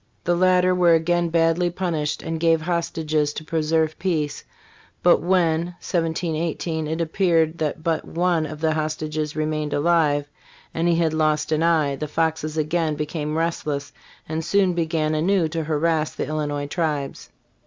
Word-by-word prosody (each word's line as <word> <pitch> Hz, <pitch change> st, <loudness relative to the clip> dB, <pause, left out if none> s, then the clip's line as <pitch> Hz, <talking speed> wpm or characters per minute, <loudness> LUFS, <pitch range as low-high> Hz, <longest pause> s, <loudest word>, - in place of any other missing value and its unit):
The 175 Hz, -, +1 dB
latter 185 Hz, 0 st, +4 dB
were 175 Hz, -2 st, +5 dB
again 170 Hz, +1 st, +1 dB
badly 165 Hz, +1 st, +2 dB
punished, 165 Hz, -4 st, -2 dB
and 165 Hz, 0 st, -3 dB
gave 165 Hz, 0 st, +3 dB
hostages 155 Hz, -3 st, -1 dB
to 155 Hz, -, -6 dB
preserve 160 Hz, 0 st, 0 dB
peace; 155 Hz, -6 st, -1 dB, 0.6 s
but 175 Hz, -, +5 dB
when, 170 Hz, -2 st, +2 dB
1718, 165 Hz, -1 st, -2 dB
it 160 Hz, +2 st, -3 dB
appeared 165 Hz, -1 st, +1 dB
that 155 Hz, 0 st, -2 dB
but 165 Hz, -1 st, 0 dB
one 170 Hz, -2 st, 0 dB
of 150 Hz, 0 st, -8 dB
the 160 Hz, -1 st, +2 dB
hostages 155 Hz, -1 st, -3 dB
remained 155 Hz, -1 st, -2 dB
alive 145 Hz, -2 st, +2 dB, 0.5 s
and 165 Hz, +1 st, 0 dB
he 170 Hz, -, +3 dB
had 165 Hz, -2 st, +1 dB
lost 155 Hz, -1 st, +1 dB
an 155 Hz, 0 st, +2 dB
eye, 160 Hz, -4 st, +2 dB
the 150 Hz, -, -4 dB
Foxes 160 Hz, 0 st, -1 dB
again 155 Hz, 0 st, 0 dB
became 150 Hz, 0 st, -3 dB
restless 155 Hz, -4 st, -2 dB, 0.3 s
and 160 Hz, +1 st, -3 dB
soon 190 Hz, +1 st, +2 dB
began 160 Hz, -2 st, 0 dB
anew 170 Hz, +2 st, +2 dB
to 165 Hz, -1 st, -3 dB
harrass 155 Hz, 0 st, 0 dB
the -, -, -2 dB
Illinois 145 Hz, -2 st, -2 dB
tribes. 145 Hz, -3 st, -3 dB
160 Hz, 155 wpm, -23 LUFS, 155-170 Hz, 0.6 s, were